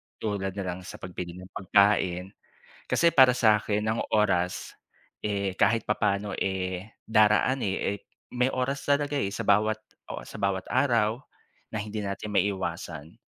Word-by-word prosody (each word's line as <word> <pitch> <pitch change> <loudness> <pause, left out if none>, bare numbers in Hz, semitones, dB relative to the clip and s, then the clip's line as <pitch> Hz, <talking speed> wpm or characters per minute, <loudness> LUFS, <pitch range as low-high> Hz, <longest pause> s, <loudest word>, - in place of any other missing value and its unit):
Tulad 100 -3 -3
na 100 - -3
lang 90 -1 -4
sa - - -8
pagbili 90 -1 -7
ng 90 +1 -11
pagkain. 95 -2 +2 0.5
Kasi, 170 - +3
para 130 -1 +8
sakin 105 -3 +3
ang 110 +1 0
oras, 95 -5 +1 0.5
eh, 100 -2 -1
kahit 110 +3 +2
papaano 105 -1 0
eh, 95 -1 -2 0.2
daraan 110 +4 +4
eh 100 0 -1
eh - - -20 0.4
may 125 +1 +3
oras 135 +2 -2
talaga 145 0 +1
eh, 100 -8 -1
sa - - -5
bawat 105 +2 +3 0.4
o - - -5
sa - - -9
bawat 100 -1 0
araw 115 -3 +2 0.5
na 110 - -2
hindi 105 0 -4
natin 100 +2 -4
maiiwasan. 85 -5 -2
100 Hz, 150 wpm, -27 LUFS, 95-110 Hz, 0.5 s, para